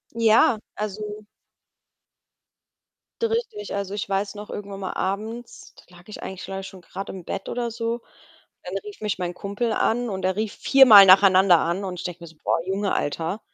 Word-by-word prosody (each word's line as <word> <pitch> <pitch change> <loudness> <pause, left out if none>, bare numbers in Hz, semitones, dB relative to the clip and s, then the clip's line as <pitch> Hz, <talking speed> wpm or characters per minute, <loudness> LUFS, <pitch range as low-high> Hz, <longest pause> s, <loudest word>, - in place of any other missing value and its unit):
Ja, 225 0 +4 0.2
also 210 0 -5 2.0
D 460 - +2
richtig. 450 - -3
Also, 200 -1 -4
ich 205 - -4
weiß 195 +1 -1
noch, 210 0 -9
irgendwann 200 -1 -7
mal 190 -1 -4
abends, 220 +5 -5
da 180 - -19
lag 175 - -19
ich 215 - -9
eigentlich, 190 -1 -7
glaube 195 0 -5
ich, 190 - -8
schon 190 - -13
grade 190 +3 -7
im 185 -2 -9
Bett 195 +3 -5
oder 240 -1 -2
so. 230 +1 -3 0.6
Dann - - -5
rief 415 -1 -10
mich 210 -3 -2
mein 175 -1 -3
Kumpel 200 +5 -3
an 240 +2 0
und 190 -3 -5
er 185 0 0
rief 215 0 -2
viermal 250 -7 +8
nacheinander 190 -1 +7
an. 175 +5 -1
Und 185 -2 -5
ich - - -8
denke 175 -1 -6
mir 170 - -9
so: 160 - -19
„Boah, - - +1
Junge, 195 +2 -1
Alter.“ 165 +7 -2
200 Hz, 190 wpm, -24 LUFS, 190-220 Hz, 2.0 s, viermal